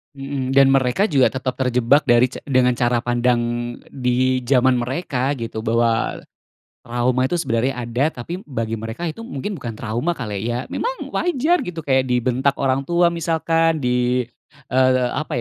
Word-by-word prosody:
Mhm, 135 -1 -3
dan 135 0 +6
mereka 135 - +2
juga 135 -5 +4
tetap 130 -1 -2
terjebak 125 +2 +2
dari 120 +1 +4
ca - - -9
dengan 125 -3 +2
cara 120 -1 +1
pandang 120 0 +1 0.5
di 130 0 0
zaman 130 0 +3
mereka 130 +1 -1
gitu 115 -3 -5
bahwa, 115 0 +1 0.6
trauma 120 +2 0
itu 155 - -2
sebenarnya 125 0 0
ada 120 +5 0 0.2
tapi 175 +8 -6
bagi 115 -5 -3
mereka 115 +9 -6
itu 165 +5 -4
mungkin 180 - -5
bukan 115 -2 -6
trauma 120 +10 -2
kali 105 -7 -4
ya, 120 +2 -2
memang - - -3
wajar 345 +1 +1
gitu 170 -3 -5
kayak 130 -2 +2
dibentak 125 +3 +1
orang 135 0 0
tua 175 0 +3
misalkan 165 -1 0
di, 125 0 +1 0.5
eee, 130 0 +3
apa 155 - -3
130 Hz, 155 wpm, -21 LUFS, 120-145 Hz, 0.6 s, dan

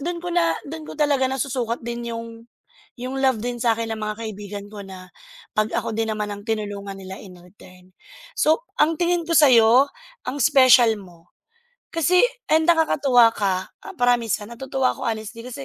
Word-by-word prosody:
doon 345 0 -3
ko 355 - -5
na 340 -1 +2 0.2
do'n 315 0 -7
ko - - -9
talaga 290 -3 +2
nasusukat 255 -3 -2
din 235 0 -5
'yong 230 0 -6 0.7
'yong 255 +2 -5
love 260 -4 +2
din 245 -1 -3
sa 230 -1 +2
'kin 225 0 -4
ng 220 - -4
mga 215 0 -3
kaibigan 205 -1 -7
ko, 210 - -9
na 185 -1 -12 0.4
'pag 215 +1 +1
ako - - -2
din 225 0 -1
naman 210 -1 -3
ang 205 0 -8
tinulungan 205 -2 -4
nila 190 0 -9
in 185 -3 -12
return. 180 0 -18 0.5
So 315 +10 +3 0.2
ang 315 +2 +3
tingin 345 -1 0
ko 335 - +1
sa 295 -4 +7
'yo, 235 +4 +6 0.4
ang 285 - -3
special 250 -3 +6
mo. 175 -3 -17 0.6
Kasi 350 +4 +3 0.3
and 315 +1 +3
nakakatuwa 275 -8 +4
ka, 190 -2 -1 0.3
promise, 245 -3 +2
ha, - - -11
natutuwa 260 +2 -1
ako, - - -8
honestly 220 +1 -5
din, - - -8
kasi 140 - -7
230 Hz, 185 wpm, -22 LUFS, 210-275 Hz, 0.7 s, sa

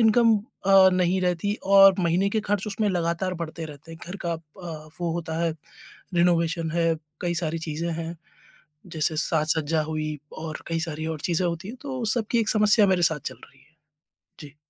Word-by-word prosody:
Income 225 0 +5 0.3
अ, 195 -1 +7
नहीं 185 +1 +1
रहती 180 +3 0 0.2
और 195 -1 +9
महीने 180 +3 +2
के 220 - 0
खर्च 205 0 0
उसमें 210 0 -1
लगातार 180 +1 -1
बढ़ते 165 -1 -5
रहते 150 +2 -12
हैं। 160 - -12
घर 195 - -5
का 170 - 0
अ, 160 -1 -9
वो 170 -2 -1
होता 165 -1 -4
है 165 - +1 0.6
रेनोवेशन 170 -1 +2
है, 165 0 +1 0.3
कई 175 -1 -1
सारी 165 -1 -2
चीज़ें 165 +1 -3
हैं 165 +1 -5 0.8
जैसे 155 0 +1
साज-सज्जा 160 0 +1
हुई 155 -1 -3 0.2
और 155 -1 -5
कई 165 -1 -1
सारी 160 -1 -4
और 160 -2 -4
चीज़ें 175 +1 0
होती 170 +3 -4
हैं, 250 - -8
तो 265 -3 -4
सब 230 - 0
की 235 - +3
एक 220 -1 0
समस्या 210 -1 +5
मेरे 185 -2 +2
साथ 160 -3 +3
चल - - -11
रही 140 - -24
है। 150 +3 -28 0.6
जी। 145 -2 -11
170 Hz, 190 wpm, -25 LUFS, 160-190 Hz, 0.8 s, और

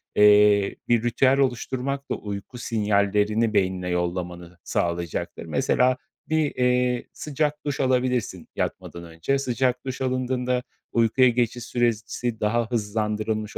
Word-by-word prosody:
eee, 105 -1 +5
bir 120 -1 +3
ritüel 130 +3 +3
oluşturmak 135 +1 -1
da - - +1
uyku 100 +3 -7
sinyallerini 105 -1 +1
beynine 95 -3 0
yollamanı 90 0 -3
sağlayacaktır. 85 -1 -2
Mesela, 125 0 +2 0.3
bir, 155 -2 +1
eee, 125 -1 +2
sıcak 150 0 -2
duş 145 -2 -2
alabilirsin 125 -8 0
yatmadan 85 - -4
önce. 85 +11 -1
Sıcak 125 -1 0
duş 130 -1 -5
alındığında 125 -1 0 0.3
uykuya 120 +2 +4
geçiş 120 0 0
süresi 120 -1 -1
daha 115 +2 0
hızlandırılmış 110 -1 -2
115 Hz, 115 wpm, -24 LUFS, 105-125 Hz, 0.3 s, eee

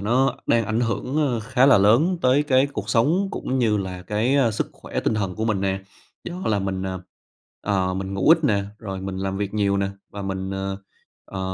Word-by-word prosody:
nó 125 +6 +2
đang 115 -1 +3
ảnh 110 +2 0
hưởng, 120 +4 -2
ơ, 120 -4 -1
khá 125 +4 +3
là 135 -7 +7
lớn 130 - +4
tới 130 +3 +4
cái 135 -2 +3
cuộc 105 -7 -6
sống 165 - +2
cũng 130 -8 -2
như 110 -4 +2
là 95 -2 -4
cái, 110 +8 +1
a, 130 -5 +3
sức 105 - -2
khỏe - - -5
tinh 110 - 0
thần 100 -3 -2
của 110 - -2
mình 105 -4 0
nè. 95 0 -1 0.4
Do 175 - -5
là 105 -2 +2
mình, 95 -1 -2
ờ, 95 -1 -4 0.6
ờ, 95 -2 0
mình 95 +1 -4
ngủ 95 +8 +1
ít 165 -1 +5
nè, 100 -5 +2
rồi 95 -4 -6
mình 95 0 -5
làm 95 0 -2
việc 100 0 -3
nhiều 100 -2 +2
nè 100 0 0 0.2
và 100 - -7
mình, 95 0 -3
ờ, 95 0 -3 0.5
ờ, 95 - -7
105 Hz, 225 wpm, -23 LUFS, 95-125 Hz, 0.6 s, là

